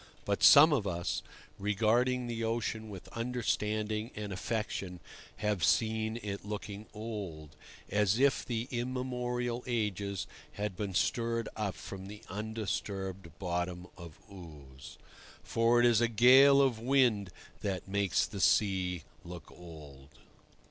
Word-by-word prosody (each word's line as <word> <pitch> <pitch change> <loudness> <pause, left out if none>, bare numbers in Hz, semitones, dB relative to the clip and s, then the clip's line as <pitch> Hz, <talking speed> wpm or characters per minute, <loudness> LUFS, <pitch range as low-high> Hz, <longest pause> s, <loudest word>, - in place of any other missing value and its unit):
But - - -1
some 155 +2 +9
of 110 -8 0
us, 85 -2 -2 0.4
regarding 115 +5 +1
the 115 -1 -3
ocean 115 -1 -2
with 95 -4 -9
understanding 110 -2 -2
and 105 -2 -5
affection, 95 -3 -3 0.4
have 105 -5 -1
seen 110 +2 +1
it 100 -1 -5
looking 105 0 -6
old, 100 -9 -7 0.3
as 105 0 +2
if 140 +2 +3
the 120 0 -3
immemorial 125 -1 -2
ages 100 -4 -2 0.3
had 105 -2 -3
been 100 -1 -4
stirred 115 +2 0
up 100 -5 -2
from 95 +4 -8
the 105 +1 -10
undisturbed 100 -3 -4
bottom 90 -1 -3
of 85 -3 -11
ooze. 75 -9 -12 0.5
For 115 +1 +3
it 120 - +5
is 120 -2 +4
a 120 - +4
gale 130 +5 +7
of 125 -5 +1
wind 120 -6 +2 0.3
that 95 -2 -3
makes 100 0 +1
the 100 - -7
sea 95 -4 +2 0.2
look 85 -2 -10
old. 75 -6 -12
105 Hz, 125 wpm, -31 LUFS, 95-115 Hz, 0.5 s, some